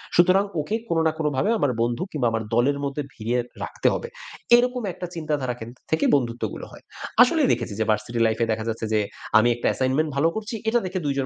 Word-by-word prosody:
সুতরাং 185 +3 +5 0.2
ওকে 155 +9 -1
কোনো 165 -1 +2
না 160 - +2
কোনো 155 -2 0
ভাবে 135 +11 +1
আমার 140 - +2
বন্ধু 120 0 0
কিংবা 135 -6 0
আমার 110 0 -1
দলের 135 +4 +3
মধ্যে 140 +1 -3
ভিড়িয়ে 120 +3 -1 0.2
রাখতে - - -1
হবে।" 470 - -3 0.5
এইরকম 250 +1 +2
একটা 180 - -6
চিন্তাধারা 150 -6 -2
কেন্দ্রিক 120 +3 -11
থেকে 160 - +2
বন্ধুত্বগুলো 120 -5 -2
হয়। - - -14 0.4
আসলেই - - +5
দেখেছি - - -3
যে 110 - +1
ভার্সিটি 115 +2 0
লাইফ 110 0 -1
এ - - +3
দেখা 110 0 -2
যাচ্ছে 110 0 -3
যে, 110 - +3 0.4
আমি 120 +2 +5
একটা 120 - -2
assignment 135 +4 0
ভালো 140 +4 +3
করছি 220 +2 -4
এটা 240 +2 +3
দেখে 185 0 -2
২ 140 - +1
জন 135 - 0
135 Hz, 215 wpm, -24 LUFS, 120-165 Hz, 0.5 s, সুতরাং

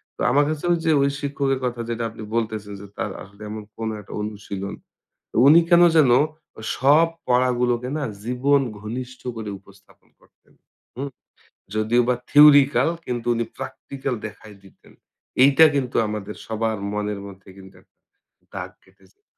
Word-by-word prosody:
তো - - -9
আমার 145 - +4
কাছেও 155 +3 0
যে 160 - +3
ওই 140 - +3
শিক্ষকের 140 -1 -1
কথা 120 -1 -3
যেটা 115 0 -2
আপনি 110 0 -10
বলতেছেন, 110 -3 -2
যে - - -9
তার - - -3
আসলে 100 +2 -17
এমন 110 0 -6
কোনো 110 -1 -3
একটা 100 - -12
অনুশীলন। 100 -2 -6 0.6
তো - - -16
উনি 155 +4 +8
কেন 175 -1 +6 0.2
যেন 145 -5 +6 0.5
ও - - -9 0.2
সব 150 +5 +5 0.2
পড়াগুলোকে 125 -1 +1
না 150 - -3 0.2
জীবন 135 +4 +2 0.2
ঘনিষ্ঠ 125 +4 -7 0.2
করে 110 -2 -5
উপস্থাপন 100 0 -23
করতেন, - - -29 0.4
হুম? 140 +3 -4 0.7
যদিও 110 +3 +2
বা 125 - +3
থিওরিটিক্যাল 145 0 +6 0.2
কিন্তু 120 -2 -4
উনি 115 0 -1
প্র্যাকটিক্যাল 135 0 -5
দেখায় 105 0 -13
দিতেন। 95 - -20 0.5
এইটা 140 +4 +7
কিন্তু 130 -3 -2
আমাদের 105 -1 -5
সবার 110 0 -2 0.2
মনের 105 -1 -3
মধ্যে 95 0 -14
কিন্তু 95 0 -14
একটা - - -36 0.6
দাগ - - -5
কেটে - - -25
যায়। 410 0 -50
120 Hz, 155 wpm, -22 LUFS, 105-140 Hz, 0.7 s, উনি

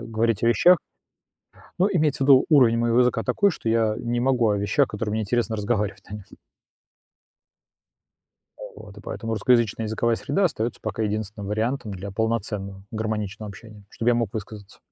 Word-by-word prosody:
говорить 115 -1 -1
о 115 - +3
вещах 175 - +5 1.0
Ну, 190 - +3
имеется 150 -6 +1
в - - +1
виду 135 -2 +7
уровень 125 -6 +5
моего 120 +1 +2
языка 125 -2 +1
такой, 200 0 +2
что 115 - -5
я 110 -1 +1
не 120 0 -2
могу 125 -3 +2
о 105 - +1
вещах, 100 +8 +1
которые 105 0 -4
мне 110 0 -1
интересно 115 +1 -1
разговаривать 105 -2 -2
на 105 - -8
нём. 100 - -11 2.3
А - - -18 0.2
вот. 105 -1 -12
И - - -10
поэтому 115 +1 -5
русскоязычная 115 0 +1
языковая 115 +1 0
среда 170 +8 -1
остаётся 120 -9 -2
пока 110 0 -4
единственным 105 -1 -3
вариантом 110 +2 -2
для 95 +1 -7
полноценного, 105 -3 -3
гармоничного 110 -1 -4
общения, 105 0 -13
чтобы 120 +1 0
я - - +3
мог 115 -4 -1
высказаться. 105 -2 -8
110 Hz, 170 wpm, -24 LUFS, 105-120 Hz, 2.3 s, виду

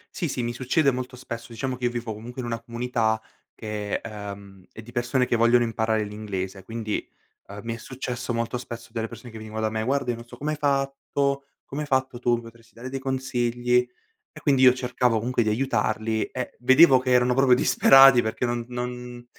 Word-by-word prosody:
Sì, 180 -3 -1
sì, 130 -3 -3
mi 120 0 -2
succede 135 +4 +2
molto 125 0 -5
spesso, 115 -1 -8
diciamo 130 +3 -3
che 125 0 0
vivo 120 -2 -3
comunque 120 +4 -7
in 120 - -5
una 115 -1 -2
comunità 115 -2 -1 0.3
che, 105 -2 -4
ehm, 100 -3 -9
è 110 - -10
di 115 +2 -13
persone 120 +1 0
che - - +1
vogliono 120 +1 +4
imparare 110 -1 0
l'inglese, 100 -2 -5
quindi, 110 +1 -4 0.4
ehm, 100 +1 -8
mi 115 0 -3
è - - -9
successo 125 0 -5
molto 115 +1 -1
spesso 120 -1 -8
delle 115 0 -3
persone 120 - -11
che 110 - -9
venivano 110 0 -6
da 110 - +1
me: 110 0 -2
"Guarda, 135 +1 0
io 120 - +1
non 115 - -10
so - - -12
come 150 +2 -2
hai 155 - -3
fatto 140 0 0 0.2
come 145 +2 -5
hai 150 - -4
fatto 130 -2 0
tu, 120 0 +1
mi 120 - -5
potresti 115 0 -16
dare 120 +2 -8
dei 135 +1 -4
consigli". 125 -2 0 0.4
E - - -13
quindi 135 -3 +3
io 125 -1 +8
cercavo 125 -2 0
comunque 120 +2 0
di 110 - 0
aiutarli, 110 -2 0
eh, 130 -1 -6
vedevo 130 +2 +7
che 130 0 -2
erano 125 0 +4
proprio 135 -1 +5
disperati 135 0 +7
perché 110 +3 -2
non 120 0 -2
non 125 0 -6
120 Hz, 205 wpm, -25 LUFS, 115-130 Hz, 0.4 s, io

